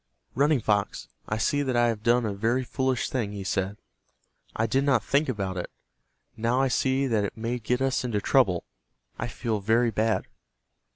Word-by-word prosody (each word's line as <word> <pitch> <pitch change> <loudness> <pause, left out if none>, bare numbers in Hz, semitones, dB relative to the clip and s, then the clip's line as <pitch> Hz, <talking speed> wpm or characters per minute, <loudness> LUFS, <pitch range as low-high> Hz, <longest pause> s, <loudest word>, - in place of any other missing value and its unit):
"Running 145 +2 +3
Fox, 105 -2 -1 0.2
I 105 - 0
see 145 +6 +1
that 130 -3 -1
I 120 0 +4
have 110 -2 -3
done 120 +1 +3
a 105 - -1
very 115 +6 0
foolish 130 0 -1
thing," 110 -6 -2
he 100 -1 -5
said. 95 +1 -2 0.8
"I 110 - +1
did 130 +5 +1
not 135 -5 +3
think 140 +1 +1
about 100 -6 -2
it. 90 - -4 0.7
Now 115 +3 +1
I 135 0 +2
see 130 +2 +1
that 110 -5 +1
it 100 - -4
may 120 +2 -2
get 125 +3 0
us 135 -1 +1
into 115 -4 -1
trouble. 100 -7 +2 0.5
I - - -2
feel 110 -3 -2
very 115 +4 +2
bad." 110 +1 0
115 Hz, 185 wpm, -27 LUFS, 105-130 Hz, 0.8 s, I